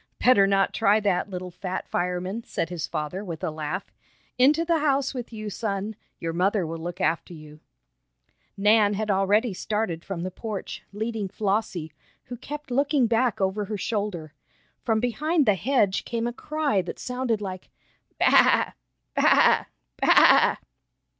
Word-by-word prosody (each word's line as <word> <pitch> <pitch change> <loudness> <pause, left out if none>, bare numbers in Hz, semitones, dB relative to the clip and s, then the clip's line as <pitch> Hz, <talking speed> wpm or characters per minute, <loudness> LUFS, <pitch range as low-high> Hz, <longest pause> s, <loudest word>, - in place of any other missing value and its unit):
"Better 200 -6 +5
not 195 0 +2
try 205 +2 +3
that, 200 -2 0
little 180 -1 -6
fat 185 +1 -5
fireman," 180 +5 -2
said 165 - -3
his 175 -3 -4
father 155 +6 -4
with 170 -5 -7
a - - -1
laugh. 155 +5 -5 0.5
"Into 295 +6 +4
the 335 -1 +2
house 280 -3 +1
with 245 -3 -6
you, 215 -2 -6
son. 205 0 -3 0.2
Your 165 0 -4
mother 190 +2 +1
will 165 +1 -5
look 175 +2 -6
after 170 -1 -1
you." 155 -1 -13 1.0
Nan 210 0 +4
had 215 0 -1
already 200 +4 +2
started 190 -4 -2
from 180 -4 -5
the 185 - -4
porch, 210 0 -6
leading 220 0 -3
Flossie, 195 -5 -2 0.3
who 245 - -8
kept 295 +2 -8
looking 280 0 +2
back 235 0 +1
over 195 +2 0
her 210 +1 -4
shoulder. 200 -7 -3 0.5
From 220 -1 +1
behind 300 +6 +1
the 210 - +5
hedge 205 - +1
came 230 -1 -3
a 240 - -2
cry 295 -7 -1
that 175 - -7
sounded 250 -3 -2
like: 185 -3 -7 0.5
"Baa! - - +5 0.4
Baa! - - +4 0.4
Baa!" - - +6
205 Hz, 155 wpm, -25 LUFS, 180-235 Hz, 1.0 s, Baa